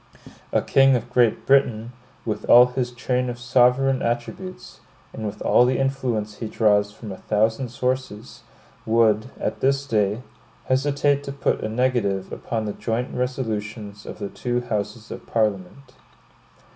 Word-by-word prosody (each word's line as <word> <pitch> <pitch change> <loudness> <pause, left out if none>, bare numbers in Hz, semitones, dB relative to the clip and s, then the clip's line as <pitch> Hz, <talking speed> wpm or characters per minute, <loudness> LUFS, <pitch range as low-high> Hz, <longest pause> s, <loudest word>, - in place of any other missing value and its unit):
A - - +1
king 135 -1 +4
of 120 0 -4
Great 120 -3 +2
Britain, 125 -4 +2 0.3
with 110 - -3
all 125 +1 +9
his 125 0 -2
train 125 +1 -1
of 120 - -5
sovereign 125 +2 +3
attributes, 120 +11 -4 0.3
and 110 - -4
with 105 +1 -7
all - - +5
the 125 +1 +2
influence 125 -6 -2
he 115 - -4
draws 105 -2 +2
from 105 0 -9
a 95 - -7
thousand 110 +4 0
sources, 125 -3 -3 0.4
would, 110 +1 +2
at - - -3
this 135 +1 +1
day, 105 -2 0 0.4
hesitate 140 +1 +1
to 140 - -4
put 140 - -1
a 110 - -2
negative 110 -5 0
upon 110 -2 -3
the 105 - -3
joint 120 +2 -3
resolutions 110 -5 -4
of - - -7
the 100 -2 -5
two 120 0 -2
houses 110 -1 -4
of - - -8
Parliament. 110 +4 -2
120 Hz, 150 wpm, -23 LUFS, 110-130 Hz, 0.4 s, all